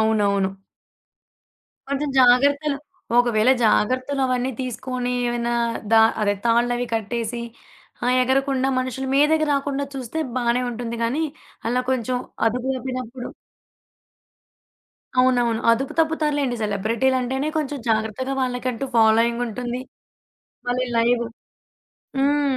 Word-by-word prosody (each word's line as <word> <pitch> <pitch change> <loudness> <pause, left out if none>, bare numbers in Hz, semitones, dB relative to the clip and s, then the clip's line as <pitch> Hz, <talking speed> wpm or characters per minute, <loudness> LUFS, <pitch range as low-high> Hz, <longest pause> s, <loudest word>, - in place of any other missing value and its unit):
అవునవును. 200 -3 +2 1.4
కొంచెం 280 +1 -1
జాగ్రత్తలు 280 +4 +4 0.4
ఒకవేళ 240 -1 +4
జాగ్రత్తలు 255 +6 +2
అవన్నీ 255 0 0
తీసుకొని 250 0 -3 0.2
ఏమన్నా 240 0 -1 0.4
దా 225 - +8 0.2
అదే 205 -1 +2
తాళ్లవి 240 +1 +2
కట్టేసి, 230 +2 -2 0.6
ఆ! - - +1 0.2
ఎగరకుండా 270 0 +1
మనుషుల 255 +1 -3
మీదకి 310 +2 +4
రాకుండా 280 0 -1
చూస్తే 265 +4 -4 0.2
బానే 240 0 +1
ఉంటుంది 235 0 -5
గానీ, 280 +8 0 0.4
అలా 250 +1 +1
కొంచెం 255 -1 0 0.3
అదుపు 250 +3 -1
తప్పినప్పుడు 255 -1 -5 1.9
అవునవును. 245 -3 +2
అదుపు 255 +4 +1
తప్పుతారులెండి. 300 -5 +1
సెలబ్రిటీ‌లంటేనే 250 +7 0
కొంచెం 295 -2 -2
జాగ్రత్తగా 220 +4 0
వాళ్ళకంటూ 250 0 -2
ఫాలోయింగుంటుంది. 235 +2 +2 0.9
మళ్ళీ 250 +1 0
లైవ్ 235 +1 +3 1.0
హ్మ్. 280 -1 +2
250 Hz, 95 wpm, -22 LUFS, 235-270 Hz, 1.9 s, దా